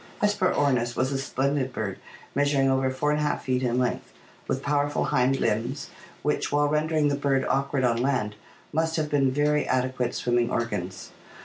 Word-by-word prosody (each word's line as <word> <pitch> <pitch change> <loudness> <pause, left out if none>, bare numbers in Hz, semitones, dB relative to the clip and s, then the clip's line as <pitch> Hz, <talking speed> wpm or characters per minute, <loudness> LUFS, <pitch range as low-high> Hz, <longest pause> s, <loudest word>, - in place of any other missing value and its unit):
Hesperornis 145 - +1
was 130 +2 0
a 135 - -1
splendid 135 0 -1
bird 100 -5 -4 0.3
measuring 140 -1 +2
over 130 0 +2
4^ 150 +3 0
feet 130 -1 -1
in 125 -1 0
length, 125 -1 -1 0.4
with 135 - -2
powerful 145 0 +1
hind 130 +2 +3
limbs 115 +6 -1 0.3
which, 150 - 0
while 145 0 +3
rendering 150 0 +1
the 140 - +1
bird 140 -2 +1
awkward 140 0 0
on 120 -2 +2
land, 125 -6 0 0.4
must 160 +1 +1
have 155 -2 -1
been 140 -2 +3
very 150 +2 +1
adequate 130 -1 0
swimming 120 -1 +1
organs. 95 -7 -3
135 Hz, 155 wpm, -26 LUFS, 125-145 Hz, 0.4 s, hind